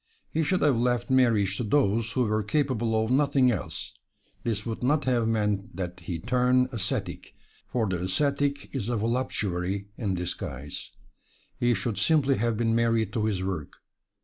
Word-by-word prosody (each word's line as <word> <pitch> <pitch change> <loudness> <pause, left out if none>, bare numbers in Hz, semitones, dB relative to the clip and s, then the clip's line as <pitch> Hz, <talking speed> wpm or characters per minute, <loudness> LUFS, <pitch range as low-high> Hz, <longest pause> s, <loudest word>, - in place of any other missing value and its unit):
He 160 - 0
should 180 +4 +1
have 140 -6 +3
left 120 +1 0
marriage 110 -7 +3
to - - -1
those 115 -1 +1
who 130 - +2
were 110 -1 +1
capable 115 -3 +1
of 110 - -3
nothing 135 -2 +4
else; 110 - -4 0.5
this 105 -3 -2
would 115 -1 -4
not 145 +3 +2
have 120 -3 +2
meant 105 -3 0
that 90 -1 -4
he 85 0 -4
turn 125 +5 +2
ascetic, 110 -6 -3 0.3
for 120 -3 0
the 90 -2 -2
ascetic 140 +7 0
is 120 -5 -2
a 120 - 0
voluptuary 100 -5 -1
in 100 -5 0
disguise. 75 -6 -5 0.7
He 120 -1 +3
should 105 +1 -2
simply 140 +2 +3
have 115 -1 0
been 115 0 +1
married 115 -2 +2
to 110 -2 0
his 100 -4 -1
work. 95 -6 -4
115 Hz, 165 wpm, -27 LUFS, 100-125 Hz, 0.7 s, nothing